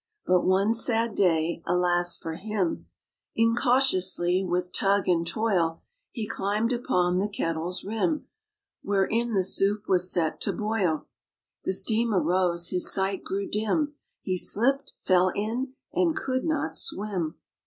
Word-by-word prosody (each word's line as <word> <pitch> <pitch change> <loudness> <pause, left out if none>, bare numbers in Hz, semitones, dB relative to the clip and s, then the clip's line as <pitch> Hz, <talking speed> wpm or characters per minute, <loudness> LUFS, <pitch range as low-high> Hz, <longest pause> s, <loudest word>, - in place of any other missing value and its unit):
But 180 -1 +2
one 195 +4 +3
sad 230 -1 +2
day, 170 -4 +1
alas 175 0 +1
for 165 - -6
him! 195 0 -3 0.5
Incautiously, 225 -6 +2
with 180 0 -2
tug 200 0 +1
and 170 -2 +1
toil, 180 -6 0 0.3
He 220 -4 -5
climbed 215 +3 -1
upon 180 -8 0
the 205 +2 -1
kettle's 170 -2 -3
rim 225 - -1 0.6
Wherein 210 +4 0
the 190 - +2
soup 200 +2 +1
was 180 -1 +2
set 165 -3 -1
to - - 0
boil. 210 -7 -1 0.6
The - - 0
steam 225 +2 +2
arose, 175 0 +1
his 180 -1 +3
sight 195 0 -1
grew 195 +1 -3
dim. 220 +8 -1 0.3
He 185 -1 -1
slipped, 275 +9 +2
fell 185 0 +2
in, 240 +6 -3 0.2
and 335 -3 +1
could 260 -1 -2
not 315 -1 -1
swim. 195 - -3
195 Hz, 135 wpm, -26 LUFS, 180-225 Hz, 0.6 s, one